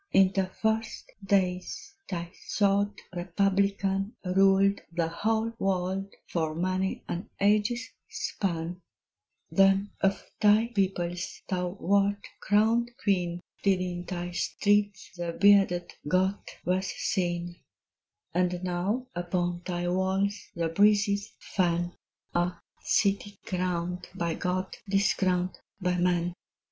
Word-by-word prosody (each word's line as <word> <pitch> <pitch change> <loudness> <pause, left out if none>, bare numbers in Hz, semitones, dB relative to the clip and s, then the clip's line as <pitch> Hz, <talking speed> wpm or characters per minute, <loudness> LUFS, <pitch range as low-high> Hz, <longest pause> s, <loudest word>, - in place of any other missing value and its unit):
In 190 -1 +5
the 190 -1 +1
first 220 +3 -2
days 190 +8 0 0.2
thy 170 -2 -4 0.2
sword 200 0 +2 0.2
republican 195 +2 +1
Ruled 195 +2 +4
the 170 -1 0
whole 220 +6 0
world 190 +1 -1
for 160 -2 -1
many 185 +2 -1
an 175 +2 -4
age's 210 +4 +2 0.2
span: 175 -1 -3 0.7
Then 195 +1 +4
of 195 0 +1
thy 215 +2 +5
peoples 185 -4 -2
thou 180 0 -2
wert 200 +1 +2
crowned 225 +4 +3
Queen, 175 -4 0 0.2
Till 195 -2 +3
in 175 -1 -3
thy 175 -1 -4
streets 205 -1 +1
the 170 -1 -3
bearded 195 -3 +4
Goth 190 +4 +1 0.2
was 185 +2 +1
seen; 175 -1 -2 0.8
And 180 0 0
now 185 +8 -1
upon 175 0 -1
thy 175 -1 -2
walls 190 +3 0
the 165 -1 0
breezes 205 +2 +3
fan 175 -2 0 0.4
(Ah, 175 0 0 0.2
city 200 0 +1
crowned 180 -1 -2
by 170 -3 -1
God, 185 +3 -2
discrowned 190 -2 +1 0.2
by 180 -1 0
man!) 175 -1 +1
190 Hz, 110 wpm, -28 LUFS, 175-200 Hz, 0.8 s, In